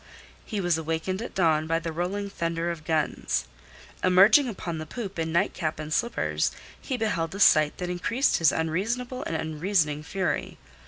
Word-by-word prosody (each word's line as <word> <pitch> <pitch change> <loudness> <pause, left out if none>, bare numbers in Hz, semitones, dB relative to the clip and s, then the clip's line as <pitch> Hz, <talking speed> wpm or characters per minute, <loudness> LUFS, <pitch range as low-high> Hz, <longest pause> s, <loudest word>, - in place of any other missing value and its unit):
He 210 - -4
was 175 -3 +1
awakened 165 +5 -2
at 235 - -7
dawn 160 -4 +2
by 165 +1 +1
the 165 0 -4
rolling 180 +5 -2
thunder 170 -2 -2
of 160 -2 -8
guns. 155 -2 0 0.6
Emerging 200 +9 +6
upon 170 -6 -5
the 155 - -6
poop 200 -3 -6
in 160 0 -1
nightcap 170 -2 0
and 155 0 -4
slippers, 235 +7 0 0.3
he 260 - -3
beheld 190 -7 -1
a - - -6
sight 155 -6 +5
that 180 - -3
increased 235 +10 +1
his 165 -2 +4
unreasonable 230 +11 -2
and 165 - -3
unreasoning 160 -1 0
fury. 185 +4 -2
170 Hz, 165 wpm, -26 LUFS, 160-200 Hz, 0.6 s, Emerging